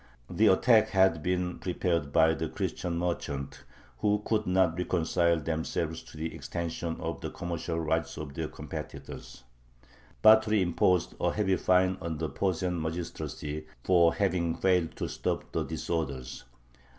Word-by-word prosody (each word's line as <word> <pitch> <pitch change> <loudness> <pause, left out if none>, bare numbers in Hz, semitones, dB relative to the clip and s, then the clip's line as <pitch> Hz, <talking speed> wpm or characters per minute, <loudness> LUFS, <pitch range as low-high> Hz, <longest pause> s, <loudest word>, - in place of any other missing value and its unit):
The 110 - +4
attack 110 +3 +5
had 95 -4 +3
been 90 +1 -1
prepared 85 -5 -1
by 80 +2 +5
the 80 0 -3
Christian 85 -2 -3
merchants, 70 -6 -3 0.4
who 105 0 +1
could 110 -1 0
not 90 -2 +3
reconcile 85 -1 +1
themselves 80 +1 -2
to - - -14
the 80 +1 -4
extension 85 0 -4
of - - -4
the - - -4
commercial 85 -1 -4
rights 80 +1 -1
of 75 -3 -6
their 80 +2 -3
competitors. - - -8 0.8
Batory 110 -1 +6
imposed 90 0 +2
a - - +2
heavy 95 -3 +1
fine 95 0 +2
on 80 -2 -3
the 80 0 -2
Posen 90 -2 -1
magistracy 80 -2 -5 0.2
for 85 -3 +4
having 90 -4 +1
failed 90 -3 +1
to - - -3
stop - - -3
the - - -1
disorders. 75 -5 -4
85 Hz, 140 wpm, -29 LUFS, 80-95 Hz, 0.8 s, Batory